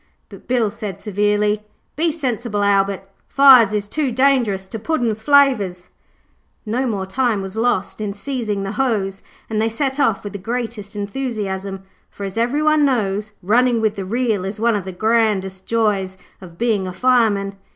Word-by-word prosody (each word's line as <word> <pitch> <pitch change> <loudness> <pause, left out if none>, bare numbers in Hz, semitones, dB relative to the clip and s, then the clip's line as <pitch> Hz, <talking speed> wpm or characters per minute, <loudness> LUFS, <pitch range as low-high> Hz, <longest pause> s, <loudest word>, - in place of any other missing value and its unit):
but - - -14
Bill 240 -4 +1
said 210 -4 -6
severely, 210 0 0 0.3
'Be 325 +2 +1
sensible, 240 -8 -2
Albert, 195 -1 +1 0.2
fires 260 -6 +7
is 205 -1 -2
too 285 +3 -1
dangerous 240 -7 +2
to 225 - -6
Puddin's 230 -5 -1
flavours.' 220 -10 +3 0.8
No 245 +5 -1
more 200 -5 -2
time 225 0 0
was 190 +1 -7
lost 225 -3 -1
in 210 -1 -2
seizing 215 -3 -3
the 195 - -3
hose 210 -5 -1 0.3
and 215 -1 -1
they 225 - +1
set 265 +4 -2
off 230 -8 +1
with 205 - -7
the 200 - -5
greatest 225 -1 -5
enthusiasm. 200 -4 -4 0.3
For, 200 - -9
as 195 -1 -5
everyone 295 +6 +2
knows, 215 -5 0
running 240 +4 +3
with 220 -2 +1
the 195 - -4
reel 220 -1 -1
is 195 +2 -5
one 230 0 +2
of 200 -3 -3
the 190 - -5
grand 215 0 +2 0.2
joys 205 -5 0 0.2
of 170 -3 -12
being 215 -4 0
a 185 - -5
fireman. 210 -3 +2
215 Hz, 165 wpm, -20 LUFS, 200-245 Hz, 0.8 s, fires